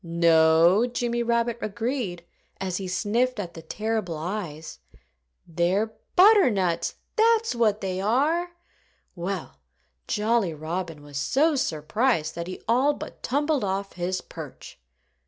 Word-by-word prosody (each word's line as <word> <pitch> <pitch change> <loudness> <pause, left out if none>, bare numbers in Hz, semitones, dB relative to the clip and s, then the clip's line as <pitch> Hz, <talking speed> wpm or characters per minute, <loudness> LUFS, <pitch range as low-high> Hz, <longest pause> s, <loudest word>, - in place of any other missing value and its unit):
"No!" 170 +4 +4
Jimmy 240 -1 -1
Rabbit 235 0 0
agreed, 215 -4 -3 0.4
as 185 -2 -2
he 195 - -4
sniffed 225 +6 0
at 175 -4 -5
the 165 - -9
terrible 210 0 -3
eyes. 160 -2 -5 0.7
"They're 180 +6 0 0.2
butternuts 220 - +4 0.2
that's 455 0 +3
what 220 -3 +1
they 190 -1 -2
are!" 295 - +1 0.7
Well, 180 0 -5 0.5
Jolly 210 -5 +1
Robin 160 0 -5
was 145 -1 -8
so 295 - +2
surprised 165 - 0
that 170 0 -5
he 185 - -6
all 260 +6 +3
but - - -9
tumbled 290 0 0
off 195 0 -2
his 180 +1 -2
perch. - - -10
200 Hz, 120 wpm, -25 LUFS, 170-240 Hz, 0.7 s, No